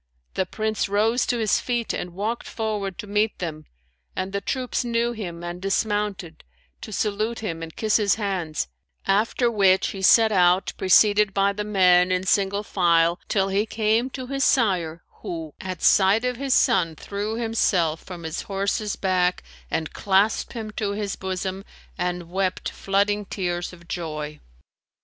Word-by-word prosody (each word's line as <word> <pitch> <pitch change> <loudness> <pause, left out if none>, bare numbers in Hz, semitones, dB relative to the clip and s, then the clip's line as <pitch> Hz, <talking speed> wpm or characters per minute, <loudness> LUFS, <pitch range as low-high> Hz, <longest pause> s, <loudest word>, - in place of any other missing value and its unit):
The 190 - -1
Prince 215 -2 -2
rose 220 +5 +2
to 245 - +1
his 220 -3 +2
feet 240 -2 -2
and 175 -1 -5
walked 220 +5 -3
forward 210 -4 -3
to - - -6
meet 210 +1 0
them; 155 -3 -5 0.5
and 190 +1 -3
the 200 - -1
troops 255 +1 -2
knew 235 0 0
him 175 -7 -6
and 175 +1 -6
dismounted, 195 -4 -2 0.4
to 215 - -8
salute 215 +3 -1
him 165 -6 -4
and 165 -1 -8
kiss 215 -1 +2
his 205 -3 +2
hands: 185 - -2 0.4
after 230 +4 +2
which 195 -3 +3
he 195 - -6
set 220 +3 +6
out 180 -1 +3
preceded 205 +2 +4
by 200 0 +3
the 210 +1 -3
men 185 -3 +4
in 185 0 0
single 200 +1 +1
file 170 -3 +2
till 195 -2 +1
he 200 +3 +1
came 220 +3 +1
to 260 -1 -6
his 275 +1 -2
sire, 180 - +1 0.2
who, 160 -3 -6
at 185 -2 -6
sight 205 +4 +5
of 250 -1 -1
his 270 0 +1
son 165 -4 +3
threw 205 +6 -4
himself 195 -8 +1
from 175 -2 -9
his 160 +1 -4
horse's 200 +2 -1
back 185 -2 +1 0.3
and 160 -1 -2
clasped 200 +2 +1
him 220 -2 -5
to 205 -1 -2
his 205 -1 -3
bosom 190 +1 -4 0.3
and 180 -1 -3
wept 185 0 -1
flooding 205 +1 0
tears 175 -3 -3
of 170 -1 -15
joy. 155 -4 -5
195 Hz, 165 wpm, -24 LUFS, 180-215 Hz, 0.5 s, set